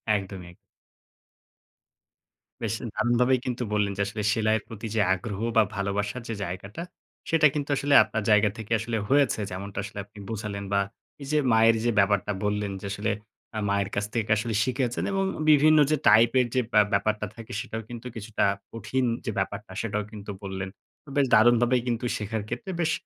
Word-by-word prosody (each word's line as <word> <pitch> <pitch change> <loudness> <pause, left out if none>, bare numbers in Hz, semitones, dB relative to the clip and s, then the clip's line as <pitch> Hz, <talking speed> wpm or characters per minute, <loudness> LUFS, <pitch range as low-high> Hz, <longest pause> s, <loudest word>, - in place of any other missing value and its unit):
একদমই, 95 -2 -5
এগ - - -19 2.1
বেশ, 110 -1 -1 0.2
দারুণভাবেই 120 +3 +2
কিন্ত 125 -1 -3
বললেন 105 -1 +1
যে, 100 - 0
আসলে 105 +1 -4
সেলাইয়ের 110 0 +1
প্রতি 115 -1 -7
যে, 105 - +3
আগ্রহ 100 0 -4 0.2
বা 110 - +7
ভালোবাসার 100 +4 -2
যে, 115 - -3
জায়গাটা 100 - -6 0.5
সেটা 165 -2 +5
কিন্তু 145 -1 -3
আসলে 145 0 +1
আপনার 110 -1 -3
জায়গা 105 0 +5
থেকে 110 0 -9
আসলে 115 0 -2
হয়েছে। 140 -5 +3
যেমনটা 95 +1 -5
আসলে 100 0 -7
আপনি 105 0 -15
বোঝালেন 105 -2 -4
বা 100 - +4 0.4
এই 140 - -7
যে, 155 - +2 0.2
মায়ের 115 0 +5
যে, 120 - +3
ব্যাপারটা 100 0 +2
বললেন 105 -1 -1
যে, - - -7
আসলে 105 +1 -1 0.5
আ - - 0
মায়ের 100 -1 0
কাছ 100 0 0
থেকে 110 -2 0
আসলে 115 +1 -2
শিখেছেন 130 -1 -1
এবং 195 0 +1 0.3
বিভিন্ন 155 +1 +6
যে, - - +5
টাইপের 115 +4 +6
যে, 130 - +4
ব্যা 105 - +7
ব্যাপারটা 105 +2 +1
থাকে 115 +1 -10
সেটাও 110 0 -5
কিন্তু 120 +1 -7
কিছুটা 110 -1 -1 0.3
কঠিন 115 +4 -1 0.2
যে, 110 - -1
ব্যাপারটা 100 +1 -4
সেটাও 105 -2 -2
কিন্তু 105 -1 -7
বললেন। 95 -1 -4 0.5
বেশ 140 -2 +3
দারুণভাবে 120 +2 +5
কিন্তু 120 +1 -1
শেখার 110 0 -3
ক্ষেত্রে 195 -4 -4
বেশ 160 -1 +1
110 Hz, 170 wpm, -26 LUFS, 100-120 Hz, 2.1 s, বা